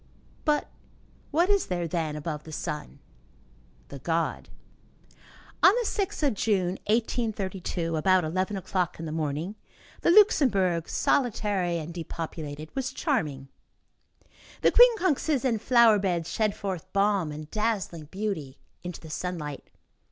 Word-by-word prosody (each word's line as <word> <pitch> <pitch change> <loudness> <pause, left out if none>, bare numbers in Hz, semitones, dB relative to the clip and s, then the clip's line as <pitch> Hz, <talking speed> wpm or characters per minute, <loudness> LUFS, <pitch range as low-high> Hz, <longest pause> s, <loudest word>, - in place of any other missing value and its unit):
But 300 -1 +2 0.6
what 335 +4 +3
is 400 -1 +2
there, 175 -2 -2
then, 160 -2 -2
above 150 0 -4
the 160 - -10
sun? 150 -1 -5 0.9
The 140 - -8
god. 165 +3 -1 1.1
On - - +8
the 480 - -1
6th 395 -6 -2
of 270 - +1
June, 190 -3 0
1832, 200 -7 -1
about 185 +3 +3
eleven 185 +5 -1
o'clock 185 -2 -2
in 165 - -5
the 155 - -4
morning, 155 +4 -2 0.5
the - - +2
Luxembourg, 210 - +4
solitary 205 -8 +1
and 165 +1 -6
depopulated, 160 -3 -6
was 265 -1 -2
charming. 150 - -1 1.1
The - - +5
quincunxes 370 - +4
and 230 -5 +1
flower 235 -3 +5
beds 175 -4 -1
shed 215 -3 0
forth 190 -5 -5
balm 200 -5 +2
and 150 +1 -7
dazzling 210 -7 -2
beauty 175 -6 -4 0.2
into 180 -2 -7
the 160 - -10
sunlight. 155 -5 -5
185 Hz, 130 wpm, -27 LUFS, 160-225 Hz, 1.1 s, On